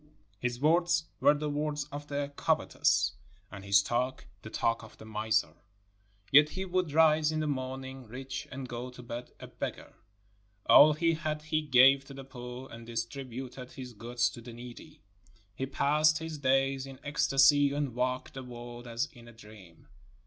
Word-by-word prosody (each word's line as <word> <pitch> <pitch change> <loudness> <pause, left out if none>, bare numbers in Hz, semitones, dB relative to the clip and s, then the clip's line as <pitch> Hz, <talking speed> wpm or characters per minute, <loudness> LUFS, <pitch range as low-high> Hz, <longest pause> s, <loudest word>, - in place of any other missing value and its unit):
His 125 -1 -2
words 170 +3 +3 0.2
were 145 - +5
the 150 +1 -3
words 150 0 -2
of 145 +1 -7
the 145 0 -3
covetous, 100 -5 +2 0.4
and 100 -1 -9
his 100 0 +4
talk 125 +4 -2 0.2
the 110 - -9
talk 115 +1 0
of 110 - -14
the - - -12
miser, 110 -1 0 0.8
yet 150 +2 +7
he 190 +4 -4
would 180 -3 -1
rise 155 0 +4
in 155 - -1
the 155 - -1
morning 130 -2 -4
rich 130 +3 -6
and 130 -1 -6
go 120 +1 -5
to 125 0 -12
bed 120 +1 -7
a - - -8
beggar. - - -6 0.7
All 150 +1 +8
he 165 +2 +2
had 155 -1 -3
he 155 0 0
gave 135 -1 +6
to 135 - -11
the 135 - -8
poor., 125 0 -9
and 115 0 -9
distributed 125 +2 -6
his 130 -3 -8
goods 120 +2 -1
to 120 - -10
the 120 0 -10
needy. 120 +5 -11 0.5
He 135 +5 -4
passed 150 +3 +3
his 160 -1 -6
days 135 0 +1
in 135 -1 -11
ecstasy 140 0 +4
and 140 -3 -2
walked 125 +1 -2
the 135 - -6
world 120 0 -9
as 120 +3 -1
in 120 -2 -15
a - - -11
dream. 105 -6 -16
130 Hz, 175 wpm, -30 LUFS, 120-145 Hz, 0.8 s, All